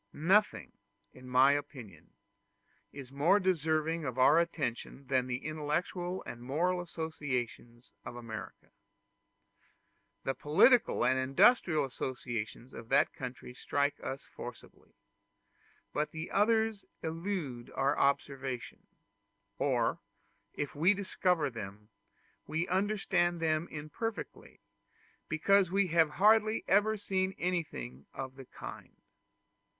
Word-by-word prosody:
Nothing, 195 +7 +2 0.4
in 130 0 -12
my 130 +2 +6
opinion, 120 - -5 0.8
is 135 -2 -10
more 155 +9 +4
deserving 160 -3 0
of 130 -3 -4
our 140 +5 +6
attention 140 -5 -3
than 130 -1 +1
the 125 +1 -4
intellectual 170 +4 -2
and 120 - -8
moral 170 +8 0
associations 130 -8 -5
of - - -8
America. 115 -3 -8 1.5
The 135 - 0
political 155 - +4
and 130 0 +3
industrial 150 - +4
associations 125 -2 -5
of 115 0 -10
that - - +3
country 125 -1 -7
strike 145 +3 -1
us 135 +1 -5
forcibly; 120 -1 -11 1.0
but 150 +1 0
the 160 +2 -6
others 220 0 +2 0.2
elude 160 -7 -4
our 135 +1 +2
observation, 140 -2 -1 0.7
or - - +1 0.6
if 145 - -3
we 175 +8 +3
discover 180 -6 0
them, 105 -2 -8 0.6
we 160 +3 -1
understand 185 -3 +1
them 160 0 0
imperfectly, 155 +9 -6 0.7
because 190 +4 +3
we 195 0 +1
have 165 -1 +4
hardly 215 +2 +4
ever 215 +2 +3
seen 190 -2 -1
anything 70 - -3
of 130 -1 -5
the 135 -1 -11
kind. - - -10
150 Hz, 110 wpm, -32 LUFS, 130-180 Hz, 1.5 s, my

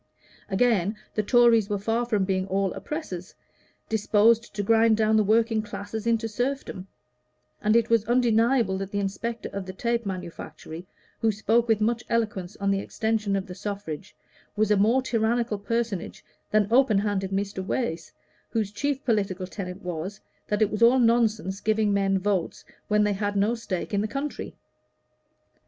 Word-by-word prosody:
Again, 210 -1 +2 0.2
the 215 - +1
Tories 230 -1 +4
were 205 - 0
far 225 +4 -1
from 210 -5 +1
being 190 0 -1
all 195 0 0
oppressors, 195 - -6 0.5
disposed 220 +2 +3
to 205 - -1
grind 225 +1 +4
down 220 0 +3
the 215 - +4
working 225 +1 +2
classes 210 +1 -6
into 230 -1 +1
serfdom; 245 -4 -3 0.7
and 215 +1 +2
it 230 0 +3
was 230 -2 +4
undeniable 235 -3 +2
that 195 -1 -4
the 200 - -4
inspector 210 +4 -3
at 195 -1 -5
the 185 - -6
tape 235 +4 -1
manufactory, 175 -3 -7 0.3
who 225 - +2
spoke 225 +3 +1
with 220 -2 +2
much 230 +2 +1
eloquence 210 -5 -1
on 200 0 0
the 195 - +1
extension 215 -1 -1
of 195 -1 -2
the 180 - -8
suffrage, 195 -3 -6 0.4
was 215 0 +1
a - - +6
more 225 +6 +3
tyrannical 230 -2 0
personage 225 -3 -3 0.2
than 215 -1 +3
open 245 -5 +5
handed 200 -2 0
Mr. 195 0 -2
Wace, 170 -6 -3 0.4
whose 215 -3 -1
chief 280 +5 -2
political 200 -6 0
tenet 185 0 -7
was 180 +3 -5 0.3
that 210 +1 +2
it 215 - 0
was 210 - -3
all 235 +3 +6
nonsense 225 -5 +2
to 215 - +2
give 220 -1 +1
men 195 -1 +2
votes 190 -3 -2 0.2
when 210 0 +3
they 210 0 +2
had 205 +1 -2
no 205 +3 +2
stake 210 -5 -4
in 200 - +2
the 215 - -1
country. 275 +5 -5
210 Hz, 170 wpm, -26 LUFS, 195-230 Hz, 0.7 s, a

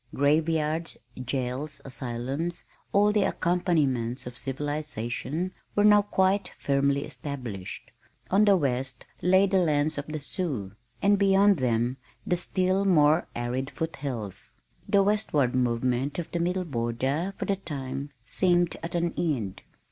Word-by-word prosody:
Graveyards, 155 +3 +1 0.3
jails, 135 +3 -3
asylums, 135 +6 -4 0.3
all 205 +1 +4
the 210 0 +2
accompaniments 150 -12 +1
of 125 -1 -7
civilization, 145 +3 -3 0.2
were 205 - +4
now 210 0 +7
quite 195 -1 +1
firmly 140 0 +1
established. 125 -10 -7 0.4
On 200 +3 +5
the 200 -2 +6
west 130 -4 -2 0.2
lay 190 +3 +5
the 195 -1 +2
lands 155 -3 +1
of 145 - -6
the 155 0 -3
Sioux 140 - -3 0.3
and 200 0 +4
beyond 200 0 +5
them 120 -1 0 0.3
the 180 - +2
still 185 +2 +1
more 160 -4 +4
arid 125 +3 -2
foot 160 0 -4
hills. 120 -9 -6 0.4
The 200 -1 +5
westward 195 - +1
movement 125 +2 0
of 175 - -4
the 170 - -1
Middle 180 +2 0
Border 135 +7 -1
for - - -3
the 200 - 0
time 140 -5 -5 0.2
seemed 175 +4 +2
at 165 +1 -5
an 170 0 0
end. 125 - -2
150 Hz, 135 wpm, -27 LUFS, 130-180 Hz, 0.4 s, now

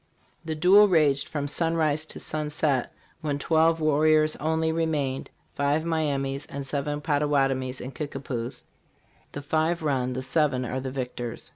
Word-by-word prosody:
"This 160 -1 -4
duel 195 +6 +7
raged 150 -6 +3
from 145 -2 -3
sunrise 155 -1 +1
to - - -9
sunset, 150 -3 -1 0.3
when 145 -3 -1
twelve 160 +2 +2
warriors 155 0 +3
only 160 +1 0
re 165 0 0
mainedfive 140 0 -2
Miamis 140 -4 -1
and 140 -1 -6
seven 145 +1 -2
Pottawatomies 135 -4 0
and 130 +2 -7
Kickapoos. 135 -5 -5 0.7
The 145 - -6
five 160 +3 0
run, 130 -4 0
the 130 +1 -4
seven 140 -3 +1
are 130 +2 -3
the 130 0 -4
victors. 125 -3 -5
145 Hz, 140 wpm, -26 LUFS, 135-160 Hz, 0.7 s, duel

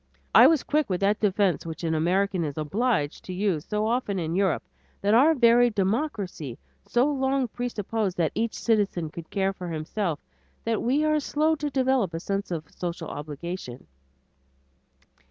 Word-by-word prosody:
I - - +9
was 320 -4 +3
quick 300 -4 0
with 180 -2 0
that 205 +2 +2
defense 200 -3 +1
which 165 0 -7
an 165 -1 0
American 180 +3 +1
is 145 -2 -4
obliged 155 - -1
to 185 - -5
use 185 -6 0
so 210 0 -1
often 225 -3 0
in 165 -2 -2
Europe, 190 -3 +1 0.4
that 205 +1 +2
our 290 +8 +6
very 240 -1 +5
democracy 200 - -2 0.3
so 240 +2 +3
long 270 -2 +1
presupposed 220 -4 -3
that 165 -3 +1
each 230 0 -1
citizen 200 -8 0
could 165 0 -9
care 195 -1 0
for 180 -2 -7
himself 165 +1 -2 0.5
that 225 -1 0
we 275 +6 +2
are 305 0 +3
slow 305 +2 +1
to 295 0 -2
develop 260 - +1
a - - -2
sense 195 +3 -3
of 160 -4 -5
social 175 -1 -5
obligation. 145 -2 -6
200 Hz, 165 wpm, -26 LUFS, 170-245 Hz, 0.5 s, I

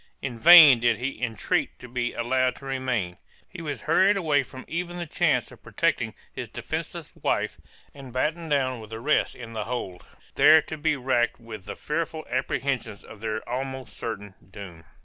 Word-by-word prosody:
In 125 -4 -4
vain 155 -5 +10
did 120 -1 +2
he 130 +3 -4
entreat 115 -5 -1
to 125 - -11
be 120 0 -2
allowed 125 +1 +1
to 140 - -13
remain; 125 -9 -2 0.3
he 185 - -10
was 145 -7 -5
hurried 200 +2 +4
away 155 -6 +2
from 130 0 -10
even 175 +1 -4
the 175 - -4
chance 145 - +1
of - - -15
protecting - - -1 0.2
his - - -6
defenceless - - -5
wife, - - -1 0.4
and 135 -3 -11
battened 160 +6 -2
down 130 -4 +1
with 110 -1 -11
the 110 0 -6
rest 150 +6 +1
in 115 -2 -9
the 110 -2 -3
hold, 105 -7 -5 0.3
there 160 - +7
to 155 - -6
be 155 0 0
racked 125 -3 0
with 110 -4 -10
the 105 - -6
fearful 160 0 -3
apprehensions 130 -3 -2
of 105 - -13
their 110 -1 -4
almost 130 0 -5
certain 105 -3 -6 0.2
doom. 90 -5 -11
130 Hz, 180 wpm, -26 LUFS, 115-150 Hz, 0.4 s, vain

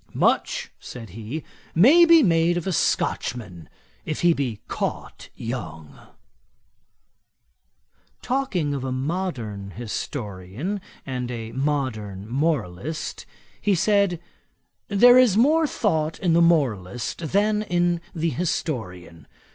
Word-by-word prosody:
'Much - - +1
(said 115 -6 -9
he,) 115 - -6 0.3
may 280 - +7
be 335 -2 +7
made 170 -2 +3
of 175 - -3
a 190 - -1
Scotchman, 100 - -1 0.3
if 155 - -4
he 175 -1 +5
be 125 -8 -3
caught - - -4
young.' 80 - -6 2.3
Talking 215 - -1
of 135 -2 -3
a 130 - -3
modern 130 - -3
historian 110 - -5 0.2
and 125 -2 -4
a 115 -2 -5
modern 115 -8 -2
moralist, 145 - -2 0.3
he 205 -2 +2
said, 200 -1 +2 0.7
'There 245 +5 +7
is 235 -6 +4
more 310 +7 +4
thought 160 - 0
in 175 -4 +1
the 170 - +5
moralist 125 - +1
than 210 +2 +2
in 175 -3 0
the 165 0 0
historian. 90 - -4
150 Hz, 110 wpm, -24 LUFS, 110-180 Hz, 2.3 s, may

